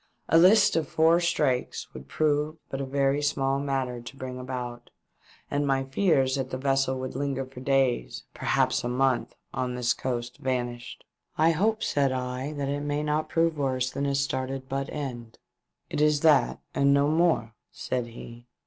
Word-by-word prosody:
A 165 - +6
list 200 +3 +6
of 160 -3 0
four 165 +2 +4
strakes 150 -7 -1
would 65 +1 -10
prove 150 - 0
but 135 - -3
a - - -2
very 140 +1 +1
small 135 -2 0
matter 135 -3 -2
to 120 +3 -11
bring 130 -1 -6
about, 125 -2 -6 0.6
and 145 0 0
my 135 -1 +1
feaiB 135 -2 +2
that 130 -1 -3
the 130 - -3
vessel 135 -1 +1
would 130 -1 -5
linger 135 -1 -2
for 130 -1 -12
days, 130 - 0
perhaps - - +1
for - - -3
a - - -2
month, 130 0 0 0.2
on 125 -1 -2
this 120 -1 +1
coast 120 -1 -4
vanished. 120 -2 -4 0.2
" - - -40
I - - +5
hope," 215 +7 +1
said 140 -2 +1
I, 125 0 -3
"it 145 -1 -3
may 145 +1 -1
not 150 +1 -1
prove 165 -2 +1
worse 130 -2 0
than 140 0 -2
a 140 - 0
started 135 -1 -2
butt 135 +1 -3
end." 120 -6 -6 0.5
"It - - -2
is 150 -1 +3
that, 155 -3 +4
and 140 0 +4
no 140 0 +3
more," 160 -8 +2 0.2
said 125 -2 -3
he. 120 +1 -11
135 Hz, 180 wpm, -27 LUFS, 125-145 Hz, 0.6 s, A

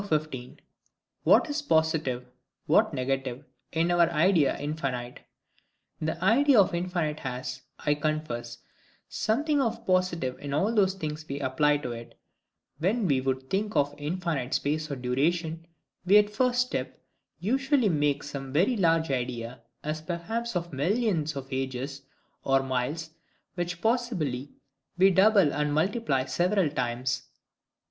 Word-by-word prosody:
15. 155 -9 -3 0.7
What - - +6
is 295 0 -2
positive, 160 - +1 0.4
what - - +4
negative, 130 +1 -2 0.3
in 165 +2 +1
our 170 -1 +4
Idea 170 -2 +3
of - - -9
infinite. 135 -5 -3 0.8
The 160 +1 -2
idea 260 +3 +5
of 190 - +4
infinite 170 -3 -1
has, 130 0 -5 0.2
I 145 - +1
confess, 145 -6 -3 0.5
something 290 +6 +1
of 230 -2 -2
positive 180 -8 0
in 140 -1 -4
all 200 +9 +1
those 195 -3 +3
things 155 -4 -5
we 140 +1 -3
apply 145 +2 +2
to 125 - -2
it. 115 0 -9 0.6
When 200 +7 +1
we 135 -4 +2
would 130 0 -2
think 205 +5 -1
of 145 -1 +2
infinite 155 -4 -2
space 155 +2 -1
or 140 - -2
duration, 160 +6 -1 0.4
we 190 +3 +6
at 210 0 +4
first 250 +3 +2
step 250 - -3 0.4
usually 265 +4 +2
make 145 -5 +1
some 135 -2 -6
very 185 - +3
large 165 -6 +2
idea, 120 -1 -3 0.2
as 155 +1 -3
perhaps 185 +8 -3
of 170 -2 -3
millions 165 - 0
of 135 -1 -5
ages, 135 +1 -3 0.4
or 135 0 +3
miles, 135 +5 -2 0.4
which 175 -1 -4
possibly 180 - 0 0.5
we 190 +2 +6
double 190 -4 +5
and 150 0 0
multiply 155 - +1
several 175 +5 +1
times. 125 -1 -2
155 Hz, 140 wpm, -28 LUFS, 135-190 Hz, 0.8 s, What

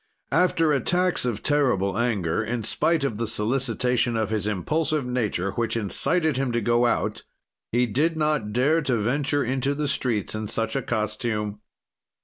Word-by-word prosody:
After 165 -4 +3
attacks 180 +5 +1
of 115 -4 -2
terrible 125 -10 +1
anger, 110 -5 0
in 115 +1 -3
spite 165 +7 +1
of 115 -6 -2
the 115 - -1
solicitation 120 +1 0
of 110 -2 -1
his 105 -1 -1
impulsive 150 - 0
nature 110 -7 -1
which 115 +2 -1
incited 150 - +1
him 135 -2 0
to 120 - +2
go 120 +2 +2
out, - - -1 0.5
he 120 +2 +3
did 150 +8 0
not 150 -9 0
dare 140 +8 +2
to 130 -5 0
venture 140 +6 0
into 135 +3 -1
the 150 0 -1
streets 115 -7 -1
in 110 0 -3
such 110 +1 -2
a 135 - +1
costume. 105 -2 -2
120 Hz, 160 wpm, -25 LUFS, 110-145 Hz, 0.5 s, After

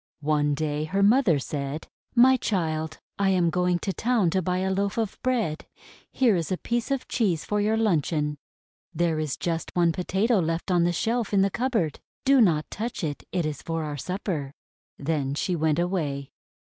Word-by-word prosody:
One 145 -1 +2
day 150 0 -1
her 195 +5 0
mother 210 - +5
said: 140 +2 -4 0.3
:<My 255 +2 +7
child, 160 -9 -1 0.2
I 195 -1 +3
am 180 -3 +3
going 180 +1 +2
to 195 - -1
town 225 -7 +1
to 190 - +1
buy 180 +1 -1
a 190 +1 0
loaf 200 +2 -1
of 220 -3 -2
bread. 230 -12 -1 0.4
Here 240 -6 +3
is 170 +1 -2
a 185 - +1
piece 235 +4 -2
of 275 -2 -1
cheese 190 -10 0
for 210 0 0
your 215 +2 +2
luncheon. 155 -8 0 0.6
There 165 -1 +1
is 155 -3 -2
just 165 -1 -2
one 170 -1 +4
Potato 195 +6 +1
left 165 +2 -1
on 175 -1 +3
the 175 - +2
shelf 225 +4 -1
in 195 - +5
the 195 0 +2
cupboard. 230 - -1 0.3
Do 270 -1 +6
not 160 -8 +3
touch 230 -2 -4
it. 145 -3 -3
It 175 -3 0
is 150 -3 -3
for 165 -1 -3
our 150 -1 -4
supper." 155 -3 -4 0.4
Then 140 -2 -1
she 180 +4 -1
went 160 -2 +1
away. 155 -6 -1
175 Hz, 190 wpm, -26 LUFS, 155-205 Hz, 0.6 s, <My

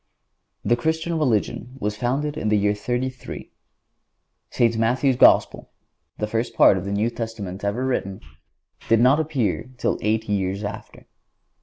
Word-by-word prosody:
The 120 - +3
Christian 160 +5 -1
religion 120 -1 -1
was 105 -3 -2
founded 135 +6 -1
in 110 -8 -2
the 105 - +3
year 105 0 +2
33. 125 +4 -4 1.0
St. 115 -1 +1
Matthew's 125 +4 +2
Gospel, - - +4 0.5
the 105 - -1
first 115 +2 -3
part - - +6
of 95 0 -4
the 100 - -3
New 105 +4 0
Testament 105 -5 -6
ever 105 +6 -1
written, 100 -7 -2 0.7
did 115 - +5
not 130 +5 +5
appear 140 -7 -1
till - - -1
eight 110 +1 0
years 100 0 -1
after. 100 - -8
115 Hz, 145 wpm, -23 LUFS, 105-130 Hz, 1.0 s, part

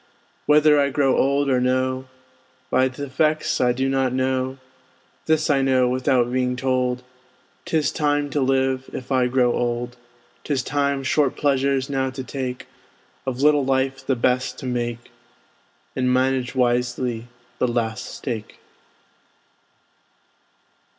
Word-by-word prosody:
Whether 150 0 +5
I 140 0 +2
grow 135 -1 +2
old 140 +1 +2
or 130 -2 +2
no, 130 +1 0 0.6
By 130 +1 +3
th' 130 - -15
effects 155 +3 0
I 125 -1 +4
do 130 +2 -1
not 135 -1 +1
know; 130 0 -1 0.7
This 155 -1 +2
I 140 -3 +3
know, 130 -2 +3
without 125 -1 +1
being 125 -1 0
told, 125 -1 0 0.6
'Tis 155 -2 +1
time 145 -1 0
to 145 - 0
live, 130 0 +1
if 130 - -7
I 130 -2 +3
grow 125 -1 +2
old; 120 0 -2 0.5
'Tis 135 -4 -1
time 140 -1 0
short 140 0 +1
pleasures 135 -1 +1
now 135 -1 -1
to 130 0 -6
take, 130 -1 -5 0.6
Of 130 +1 -2
little 150 -1 +5
life 135 0 0
the 135 0 0
best 125 +1 0
to - - -7
make, 120 -1 -3 0.8
And 125 0 +1
manage 130 0 +1
wisely 120 -1 0 0.3
the 125 - +2
last 115 -2 -2
stake. 115 -5 -6
130 Hz, 135 wpm, -22 LUFS, 125-135 Hz, 0.8 s, Whether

